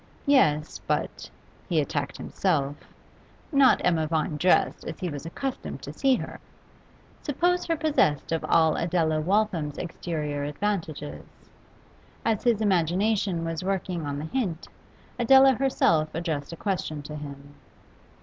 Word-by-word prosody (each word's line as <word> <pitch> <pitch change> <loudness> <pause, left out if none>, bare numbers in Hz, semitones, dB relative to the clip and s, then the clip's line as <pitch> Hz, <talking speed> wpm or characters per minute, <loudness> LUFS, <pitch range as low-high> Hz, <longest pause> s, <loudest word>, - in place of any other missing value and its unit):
Yes, 155 - +3
but - - -2 0.4
he 165 -4 +2
attacked 140 -1 -2
himself 145 -7 -1 0.8
not 275 -3 +5
Emma 160 -3 +2
Vine 155 -1 -1
dressed 180 +5 +2
as - - -6
he 180 - -2
was 145 +1 -6
accustomed 265 +10 -5
to - - -7
see 270 -1 +3
her; - - -6 0.8
suppose 350 +5 +1
her 330 - +1
possessed 290 - +1
of 165 - 0
all 160 -1 +4
Adela 165 -2 +1
Waltham's 175 -5 0
exterior 150 -4 -3
advantages. 155 - -4 0.9
As 225 -3 +1
his 235 -3 +2
imagination 190 -1 +1
was 165 +1 -3
working 185 -4 -2
on 140 0 -3
the 150 - -4
hint, 180 -4 -2 0.5
Adela 265 +3 +7
herself 165 - +1
addressed 160 -4 -3
a 165 - -7
question 160 -7 -3
to 150 +1 -7
him. 140 -1 -9
165 Hz, 130 wpm, -26 LUFS, 150-215 Hz, 0.9 s, Adela